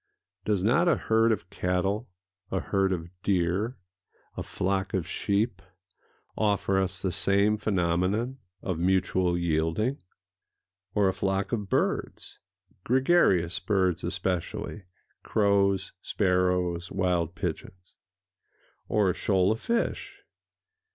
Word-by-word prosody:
Does 100 -4 +1
not 120 - +3
a 170 - +5
herd 115 0 +2
of 100 -4 -3
cattle, 95 +5 -1 0.4
a 95 - -1
herd 95 0 0
of 85 -2 -3
deer, 95 +4 0 0.6
a - - -4
flock 95 0 -1
of 90 -3 -1
sheep, 105 +4 -1 0.7
offer 100 -2 +1
us 95 -1 -1
the 95 -1 -1
same 100 +3 +3
phenomenon 100 +6 0 0.2
of 90 -4 -2
mutual 90 0 +1
yielding? 85 - 0 1.0
Or 100 -2 +4
a 95 - +2
flock 95 +1 -1
of 105 -5 -2
birds—gregarious 105 - 0
birds 95 -4 0
especially: 95 +2 -3 0.4
crows, 100 -2 +2
sparrows, 90 -2 0
wild 90 -3 0
pigeons? 90 +1 -6 0.9
Or 100 -3 +2
a - - -3
shoal 95 +1 +2
of 110 - -2
fish? 235 0 -2
95 Hz, 110 wpm, -27 LUFS, 90-105 Hz, 1.0 s, a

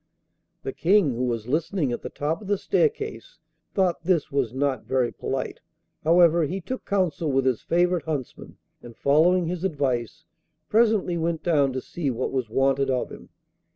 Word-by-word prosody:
The 405 - -4
King, 190 - +3
who 125 +2 -1
was 115 -2 -2
listening 155 +1 0
at 120 - -3
the - - -6
top 155 +6 -2
of 205 - -10
the 205 0 +1
staircase, 450 - -1 0.4
thought 185 -4 +1
this 170 -3 +1
was 135 -5 0
not 135 +1 -1
very 125 -2 0
polite; - - -4 0.4
however, 170 0 +5
he 185 +7 -3
took 255 +9 -6
counsel 180 -6 0
with 135 0 +1
his 130 -4 +1
favourite 175 0 +1
huntsman, 145 -6 -5 0.2
and, 120 -1 -12
following 170 +6 +3
his 175 +1 -3
advice, 140 - -2 0.4
presently 215 -6 +2
went 165 -1 -1
down 145 -6 +3
to 130 - -3
see 155 0 -3
what 125 0 -2
was 130 -4 -2
wanted 135 +3 +2
of 130 -2 -1
him. - - -11
160 Hz, 170 wpm, -25 LUFS, 135-180 Hz, 0.4 s, however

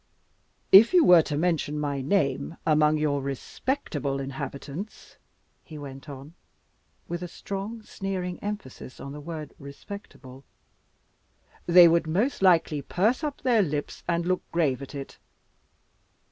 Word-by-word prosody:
"If 220 - +8
you 350 - +7
were 175 -2 +8
to 150 -2 -3
mention 155 -3 0
my 145 -2 -2
name 140 0 0
among 155 -1 +4
your 145 -2 0
respectable 140 - -3
inhabitants," 140 +7 -7 0.5
he 155 - -10
went 140 0 -9
on, 140 +3 -10 0.7
with 175 +1 -4
a 180 - -4
strong, 200 +5 -6
sneering 185 -3 -4
emphasis 205 -11 -7
on 140 - -7
the 150 +1 -8
word 155 -1 -7
respectable, 140 -3 -11 1.2
"they 175 0 +9
would 165 -1 +2
most 200 - 0
likely 165 -5 +3
purse 215 - 0
up 295 -2 -3
their 240 -4 +3
lips 150 -5 -3
and 170 0 0
look 185 0 0
grave 145 -7 +1
at 140 +1 -9
it. 140 -1 -8
160 Hz, 130 wpm, -26 LUFS, 140-190 Hz, 1.2 s, they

